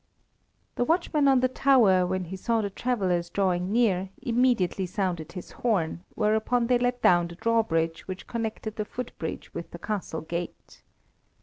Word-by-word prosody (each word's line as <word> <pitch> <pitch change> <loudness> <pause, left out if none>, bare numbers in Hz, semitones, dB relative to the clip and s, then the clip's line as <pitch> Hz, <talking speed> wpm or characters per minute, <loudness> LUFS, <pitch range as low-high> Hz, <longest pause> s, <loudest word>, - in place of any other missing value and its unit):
The - - +2
watchman 310 -1 +2
on 265 -2 +5
the 255 - +4
tower, 235 -9 +4
when 185 0 -1
he 180 +2 -6
saw 225 +4 0
the 200 -1 -3
travellers 190 -7 0
drawing 185 -1 0
near, 200 -5 +2
immediately 235 -8 +1
sounded 180 -5 -3
his 180 - -8
horn, 180 -7 -1
whereupon 220 +3 +1
they 245 0 +3
let 245 0 -1
down 175 -1 +5
the 170 - -10
drawbridge 170 -7 0
which 185 -1 -6
connected 220 -2 -4
the 210 - -2
footbridge 250 +3 -6
with - - -6
the - - -9
castle 200 -7 -4
gate. 170 +2 -6
205 Hz, 160 wpm, -27 LUFS, 180-240 Hz, -, on